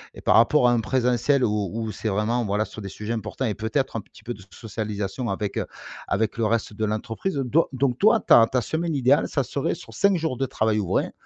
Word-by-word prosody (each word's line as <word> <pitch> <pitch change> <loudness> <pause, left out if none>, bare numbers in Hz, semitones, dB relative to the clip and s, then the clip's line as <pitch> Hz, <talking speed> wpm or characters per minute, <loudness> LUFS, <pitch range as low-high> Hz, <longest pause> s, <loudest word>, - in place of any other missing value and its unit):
et - - -10
par - - +3
rapport 125 +3 +5
à 120 - +4
en 115 - +2
présentiel 125 +3 +1
où 105 -4 0
où 110 0 -3
c'est 110 +2 -3
vraiment, 105 +4 0
voilà, 105 +2 0
sur 110 - -10
des 100 - -6
sujets 105 +4 -5
importants 110 +3 -3
et 110 - 0
peut-être 110 +7 -2
un 115 - -2
petit - - -19
peu 120 - -4
de 100 - -13
socialisation 105 +2 -4
avec, 100 +1 -3
heu, - - -3 0.4
avec 110 +2 0
le 115 - +2
reste 110 -1 -1
de 110 - -4
l'entreprise 110 - -3
donc 140 +4 +2
donc 130 -2 0
toi, 220 +2 +5
ta 115 - +6
ta 125 +1 0
semaine 160 +7 -2
idéale, 135 +1 +3
ça - - 0
serait - - -2
sur - - -13
5 200 -3 +3
jours 160 -5 -2
de 135 - -1
travail 110 -2 0
ouvré. 95 -4 0
115 Hz, 235 wpm, -24 LUFS, 105-130 Hz, 0.4 s, ta